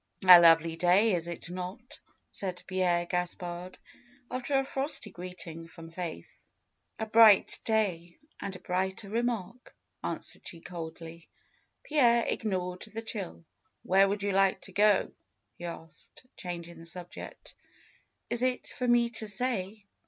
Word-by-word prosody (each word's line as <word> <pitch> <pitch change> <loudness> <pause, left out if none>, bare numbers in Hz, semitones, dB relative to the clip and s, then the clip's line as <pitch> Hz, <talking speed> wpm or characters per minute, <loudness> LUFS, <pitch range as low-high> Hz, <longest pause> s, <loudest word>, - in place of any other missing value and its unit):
lovely 165 -3 +8
day, 180 +6 +4
is 170 -1 -1
it 170 0 -7
not?'^ 185 +7 -7 0.3
said 185 -3 -3
Pierre 180 -2 +1
Gaspard, 180 0 -3 0.5
after 255 +2 0
a 270 - +2
frosty 270 -5 0
greeting 175 -2 -8
from 165 0 -12
Faith. 165 - -7 0.6
^^A 220 -1 -5
bright 220 -3 +6
day, 185 -6 0 0.2
and 195 -1 -5
a - - -9
brighter 190 +3 -2
remark," 235 0 -3 0.3
answered - - -3
she 170 - -9
coldly. 165 -1 -9 0.5
Pierre 240 -6 +4
ignored 180 -4 -2
the 220 +1 -6
chill. 85 - -5 0.4
"Where 195 +1 +4
would 200 0 -2
you 200 - 0
like 195 0 +3
to 195 - -10
go?" 205 0 +3 0.4
he 175 - -9
asked, 165 +6 -9
changing 170 -1 -7
the 165 - -11
subject. 175 +1 -9 0.7
"Is 235 - +1
it 255 0 0
for 250 - -3
me 240 -1 +4
to 220 -1 -1
say? 210 -3 -2
185 Hz, 135 wpm, -30 LUFS, 175-220 Hz, 0.7 s, lovely